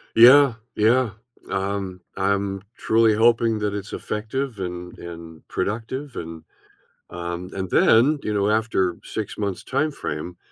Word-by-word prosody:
Yeah. 125 +2 +8 0.2
Yeah, 115 +1 +3 0.4
um, 95 -1 -2 0.2
I'm 100 0 0 0.2
truly 110 0 +3
hoping 115 0 +3
that 105 -1 -1
it's 100 0 -5
effective 115 +3 -3
and 90 -1 -6
and 85 -2 -10
productive, 120 +6 -3
and, 80 -1 -7 0.7
um, 85 +1 -5
and 95 -1 -4
then, 130 +12 +5
you 105 - -1
know, 100 0 +1
after 105 -5 +1
6 110 -2 -5
months' 100 -3 -2
time-frame, 130 - -3
105 Hz, 125 wpm, -23 LUFS, 90-115 Hz, 0.7 s, Yeah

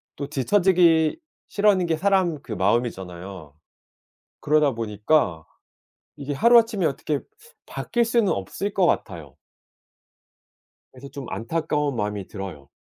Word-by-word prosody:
또 140 - -5
뒤쳐지기 165 - +3 0.3
싫어하는 200 -3 +2
게 160 -1 0
사람 185 -4 +1
그 120 - -12
마음이잖아요. 95 - -3 0.9
그러다 150 -1 +2
보니까 105 - 0 0.7
이게 145 0 -5
하루 235 - +6
아침에 225 -6 +1
어떻게 145 0 -2 0.5
바뀔 240 0 -1
수는 230 -3 +2
없을 145 - -4
것 190 -3 +2
같아요. 80 - -3 1.5
그래서 130 +2 -12
좀 140 -1 -8
안타까운 150 +2 -2
마음이 105 -3 -3
들어요. 95 -9 -8
140 Hz, 275 characters per minute, -23 LUFS, -, 1.5 s, 하루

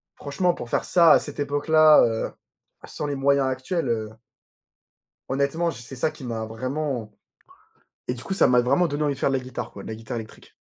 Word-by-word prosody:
franchement, 175 +5 0
pour 120 - -8
faire - - 0
ça, 170 -3 +5
à - - +7
cette 145 -1 -8
époque-là, 150 +2 +5
heu, 115 -1 -2 0.5
sans 150 - -5
les 145 - -2
moyens 140 0 +2
actuels, 130 +3 -2
heu 110 -2 -1 1.2
honnêtement, 140 +5 0
je 120 - -10
c'est 120 +3 -10
ça 130 +5 0
qui - - -13
m'a 115 -2 -3
vraiment 130 0 -4 0.9
et - - 0
du 125 0 -6
coup, 195 - -3
ça 195 - +4
m'a 125 -1 +4
vraiment 170 +9 +2
donné 150 0 -2
envie 145 -2 0
de - - -14
faire - - +1
de 135 - +1
la 130 - -6
guitare, 130 -1 -6
quoi, 100 - -10
de - - -10
la 110 - -5
guitare 115 +2 -6
électrique. 110 -1 -11
135 Hz, 215 wpm, -24 LUFS, 120-150 Hz, 1.2 s, à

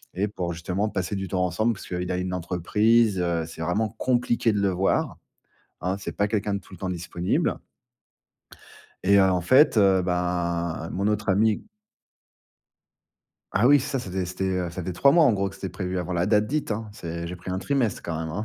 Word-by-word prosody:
Et 100 +3 0
pour 90 -4 -4
justement 90 +5 -2
passer 95 0 -3
du 95 -1 -3
temps 90 -2 +1
ensemble, 110 +7 +1
parce 100 - -10
qu'il 90 0 -3
a 90 - -1
une 90 0 -3
entreprise, 100 +5 +2
heu, 85 -2 0
c'est 80 - -9
vraiment 95 +7 0
compliqué 120 -3 +1
de 105 - 0
le 100 - +2
voir, 95 +1 0 0.6
hein. 95 +2 -1
C'est - - -5
pas 105 - +1
quelqu'un 105 -1 -1
de - - -2
tout 95 - -17
le - - -18
temps 95 - -3
disponible 90 0 -1 1.5
et, 100 +2 +5
heu, - - +6
en 90 -1 +1
fait, 130 - +5
heu, 95 -2 +4
bah 85 -2 -1
mon 100 +2 0
autre 105 0 -1
ami 105 +2 +2 1.9
Ah 105 +5 +4
oui 145 0 +6
ça 135 +1 -2
c'était 95 -5 -3
c'était 90 +2 -4
heu, 90 -2 -1
ça 90 - -6
faisait 90 0 -4
3 140 +10 +5
mois 170 -2 +6
en 120 - +4
gros 100 -1 -1
que - - -14
c'était 95 - -5
prévu, 90 -1 -4
avant 90 0 -3
la 85 0 +1
date 105 +1 +3
dite 150 +3 -2
hein. 110 +1 -3
C'est 85 -5 -6
j'ai 90 +2 -6
pris 90 +1 -8
un 95 - -1
trimestre 125 -2 0
quand 80 -2 -4
même 80 0 -4
hein. 105 +7 -3
95 Hz, 210 wpm, -25 LUFS, 90-105 Hz, 1.9 s, heu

